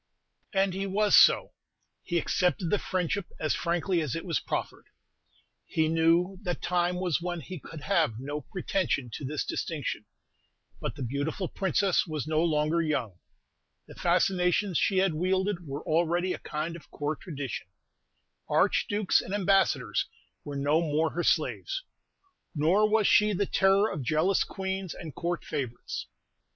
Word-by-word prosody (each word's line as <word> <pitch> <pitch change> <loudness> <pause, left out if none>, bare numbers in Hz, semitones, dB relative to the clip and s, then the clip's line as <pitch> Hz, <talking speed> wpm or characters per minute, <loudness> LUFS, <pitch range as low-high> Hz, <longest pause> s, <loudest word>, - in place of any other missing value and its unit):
And 195 -1 +2
he 195 +1 -2
was 205 +2 +3
so; - - +6 0.5
he 175 - -2
accepted 180 0 +1
the 210 - +3
friendship 185 +1 -1
as 155 - +1
frankly 175 +1 0
as 145 -6 -2
it 165 - -4
was 170 -5 0
proffered. - - -4 0.8
He 160 -1 +1
knew 165 +4 +2
that 180 -4 -3
time 180 0 +1
was 180 -2 0
when 175 0 -3
he 180 +3 -7
could 155 +2 -10
have 155 - +1
no 145 +3 -4
pretension 150 -5 -2
to - - -6
this 145 +2 -2
distinction: 145 -9 -3 0.7
but - - -4
the 140 - -5
beautiful 145 - -2
Princess 190 0 +1
was 155 -3 -3
no 155 +1 +1
longer 155 0 +2
young; 125 - -2 0.7
the - - -13
fascinations 180 +1 +2
she 195 - +2
had 190 -2 +3
wielded 185 +1 0
were 140 +2 -5
already 175 +3 +1
a - - -6
kind 155 +2 -4
of 170 - -13
Court 150 +1 -3
tradition; 140 - -5 0.8
archdukes 205 -2 +2
and 195 - -4
ambassadors 185 - +2 0.4
were 145 - -6
no 145 +4 +2
more 160 0 +1
her 175 - -2
slaves; - - 0 0.7
nor 180 +8 +3
was 215 -1 +3
she 210 -3 +5
the 200 +2 +1
terror 195 +2 +3
of 150 - -4
jealous 155 +9 +2
queens 190 -2 -4
and 160 -4 -8
Court 175 +5 -3
favorites. 130 -6 -4
170 Hz, 150 wpm, -28 LUFS, 150-190 Hz, 0.8 s, so